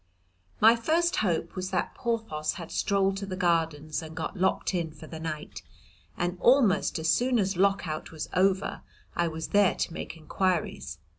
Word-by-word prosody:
My 225 +2 +7
first 330 +9 +1
hope 170 -4 0
was 185 0 -3
that 180 -2 -1
Porthos 220 -11 -2
had 170 -4 -8
strolled 195 -1 +1
to 200 0 -5
the 185 - -4
Gardens 160 -4 0
and 160 0 -9
got - - -4
locked 190 0 +1
in 170 -3 -1
for 155 - -12
the 160 0 -8
night, 155 -2 -5 0.6
and 175 +1 -2
almost 240 -6 +4
as 160 0 -2
soon 245 +8 +3
as 195 -2 +1
Lock 195 0 +2
out 155 0 -5
was 160 -2 -5
over 190 +1 +1 0.3
I 170 - +1
was 160 -1 -5
there 205 -2 +4
to - - -2
make 165 - -6
inquiries. 155 - -1
185 Hz, 175 wpm, -28 LUFS, 160-200 Hz, 0.6 s, My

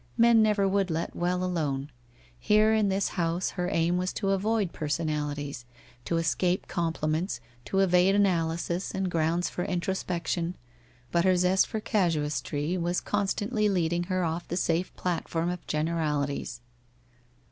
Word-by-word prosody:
Men 230 -1 +6
never 210 -2 +3
would 195 -1 +1
let 165 +1 -2
well 180 +1 0
alone. 150 -6 -2 0.5
Here 215 +1 +4
in 215 -2 +3
this 195 0 0
house 170 +1 -1
her 180 0 -2
aim 170 -1 +1
was 185 0 -1
to 195 -2 -1
avoid 200 -1 0
person 155 +1 -2
alities, 145 -3 -3 0.4
to 170 - 0
escape 175 +3 0
compliments, 165 +1 -1 0.3
to 195 - +1
evade 185 +1 +4
analysis, 170 -2 +1
and 190 -1 -1
grounds 165 +2 +1
for 180 - -3
introspection, 175 -1 -2 0.6
but 170 0 +2
her 185 -1 +4
zest 180 +1 +3
for 220 - -3
casuistry 160 -4 0
was 175 +1 0
constantly 210 +2 0
leading 175 -2 0
her 185 0 0
off 165 +1 -2
the 175 - -3
safe 175 +1 0
platform 170 -1 -1
of 180 - -7
generalities. 150 -5 -1
175 Hz, 145 wpm, -28 LUFS, 165-190 Hz, 0.6 s, Men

